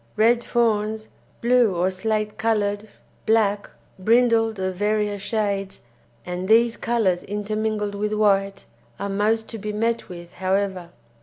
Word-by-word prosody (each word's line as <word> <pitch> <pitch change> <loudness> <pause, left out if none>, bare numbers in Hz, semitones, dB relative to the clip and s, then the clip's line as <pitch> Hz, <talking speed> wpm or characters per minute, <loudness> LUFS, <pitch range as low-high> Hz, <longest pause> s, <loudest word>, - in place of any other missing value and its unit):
Red 235 +2 +3
fawns, 220 -2 0 0.3
blue 235 -4 +3
or 180 +2 +1
slate 215 +2 -2
coloured, 210 -2 0 0.4
black, 210 -2 +2 0.3
brindled 225 +1 +3
of 185 0 -2
various 210 0 0
shades, 200 -2 -2 0.4
and 180 +1 -4
these 230 +2 +4
colours 215 -7 0
intermingled 210 0 -2
with 210 +1 -2
white, 195 -2 +1 0.3
are 200 - -3
most 215 +3 0
to 225 - -7
be 210 +1 -4
met 225 +2 -1
with, 175 -1 -10
however. 190 -1 -1
210 Hz, 130 wpm, -23 LUFS, 195-225 Hz, 0.4 s, these